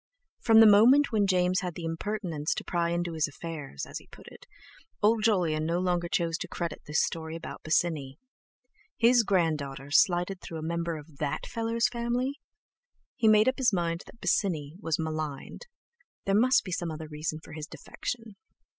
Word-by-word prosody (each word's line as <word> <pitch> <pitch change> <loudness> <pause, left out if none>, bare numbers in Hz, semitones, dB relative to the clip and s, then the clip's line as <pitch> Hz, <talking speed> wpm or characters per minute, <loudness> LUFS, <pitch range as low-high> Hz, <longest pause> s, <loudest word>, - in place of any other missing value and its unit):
From 225 - +6
the - - +9
moment 235 +8 +6
when 210 -3 +2
James 185 0 +2
had 180 -3 -4
the 175 - -7
impertinence 165 -2 -2
to - - -4
pry 170 -2 -1
into 170 0 -2
his 160 -2 +1
affairs—as 145 - -7
he - - -20
put - - -15
it—old 215 +1 -3
Jolyon 175 -8 +2
no 165 +2 0
longer 175 -1 0
chose 165 -1 0
to - - -4
credit 170 -3 -5
this 150 +1 +2
story 160 -1 -4
about 165 - -8
Bosinney. 155 -4 0 0.8
His 240 +1 +5
grand 170 -7 +1
daughter 135 0 -7
slighted 180 +4 +3
through 165 - -7
a 155 - -6
member 170 0 -2
of 150 -1 -13
"that 145 -1 -2
fellow's" 230 +1 0
family! 245 +3 -2 0.8
He 225 - +2
made 215 +1 +6
up 260 - +1
his 250 -3 +3
mind 170 -2 -1
that 230 - -15
Bosinney 155 -7 0
was 165 -6 -1
maligned. 155 - -5 0.6
There 195 - +1
must 235 +2 +4
be 190 - -7
some 175 0 -2
other 160 0 -6
reason 155 +1 -4
for 155 - -13
his 155 0 -6
defection. 225 -4 -7
175 Hz, 175 wpm, -28 LUFS, 155-215 Hz, 0.8 s, the